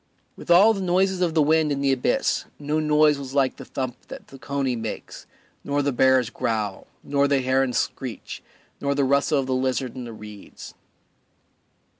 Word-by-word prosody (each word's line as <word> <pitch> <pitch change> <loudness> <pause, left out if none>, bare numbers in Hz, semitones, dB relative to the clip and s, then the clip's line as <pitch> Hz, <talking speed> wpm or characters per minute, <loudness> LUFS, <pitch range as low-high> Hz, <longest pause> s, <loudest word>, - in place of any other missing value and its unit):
With - - -13
all 195 +6 +7
the 195 - -4
noises 185 +1 +1
of 170 -3 0
the 155 - +4
wind 155 0 +2
in 140 - -1
the 140 -1 +2
abyss, 130 -2 0
no 150 +1 -1
noise 150 -1 +3
was 135 0 -8
like 135 -2 +1
the - - -9
thump 130 -2 -4
that - - -10
the 135 - -13
coney 135 -2 -2
makes, 110 -2 -7 0.4
nor 145 0 -1
the 140 - +1
bear's 130 -1 +3
growl, 105 -5 -3 0.2
nor 140 0 +1
the 140 -1 +2
heron's 130 -1 +1
screech, 125 -4 -4 0.4
nor 140 0 -1
the 140 - +1
rustle 140 +3 +2
of 135 - 0
the 130 - -2
lizard 130 -1 -1
in 125 -1 -6
the 120 - -8
reeds. 105 -2 -11
140 Hz, 185 wpm, -24 LUFS, 130-150 Hz, 0.4 s, all